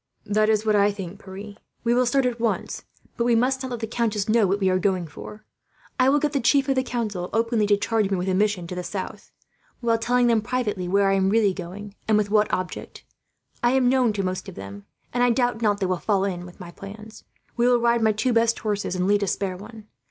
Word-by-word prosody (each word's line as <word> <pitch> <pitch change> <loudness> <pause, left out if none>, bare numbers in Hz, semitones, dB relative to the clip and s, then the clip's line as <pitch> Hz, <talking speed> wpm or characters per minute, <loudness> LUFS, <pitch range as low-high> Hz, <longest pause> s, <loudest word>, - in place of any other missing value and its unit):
"That 215 +1 +2
is 215 0 +2
what 215 -1 +3
I 205 0 +4
think, 195 0 -8
Pierre. 200 +2 -9 0.3
We 235 0 +2
will 250 0 +3
start 270 +2 +2
at 245 -1 -1
once, 230 -1 -2 0.3
but 235 - +1
we 235 0 +3
must 260 +3 +1
not 260 - -4
let 240 -2 -5
the - - -1
countess 220 -3 -1
know 220 -2 +3
what 195 +2 0
we 190 - +1
are 185 0 +2
going 185 -2 0
for. 210 +7 -11 0.5
I 255 +1 +5
will 285 - +4
get 295 0 0
the 280 - +1
chief 270 +3 +3
of 270 - +3
the 260 - +1
council, 215 -8 -3
openly, 225 -1 +1
to 205 0 +4
charge 215 -1 0
me 195 - 0
with 180 +1 -3
a 190 - +1
mission 200 -2 +1
to 170 - -6
the 180 0 -4
south; 190 +1 -6 0.5
while 230 -2 +1
telling 245 +2 +2
them, 230 -2 +3
privately, 215 -6 -2
where 200 +2 +3
I 195 - +3
am 190 0 +2
really 210 -2 +3
going, 195 +3 -8
and 215 -1 +4
with 205 -1 0
what 210 -1 +3
object. 185 -1 -4 0.6
I 240 +1 +3
am 260 -2 +3
known 255 -3 +3
to 200 -1 -2
most 185 0 -3
of - - -11
them, 100 +1 -9 0.3
and 245 - 0
I 245 - +4
doubt 245 -1 +1
not 205 -2 +2
they 195 - 0
will 185 -1 0
fall 195 0 +1
in 180 -2 -4
with 175 - -15
my 175 -2 -9
plans. 210 +4 -11 0.3
"We 240 0 +2
will 245 -1 +5
ride 235 0 +2
my 220 -1 +4
two 245 +4 0
best 230 0 +3
horses, 205 -3 -2
and 180 0 0
lead 205 +1 +3
a 200 - 0
spare 190 -1 -2
one. 215 +3 -11
210 Hz, 255 wpm, -24 LUFS, 195-235 Hz, 0.6 s, I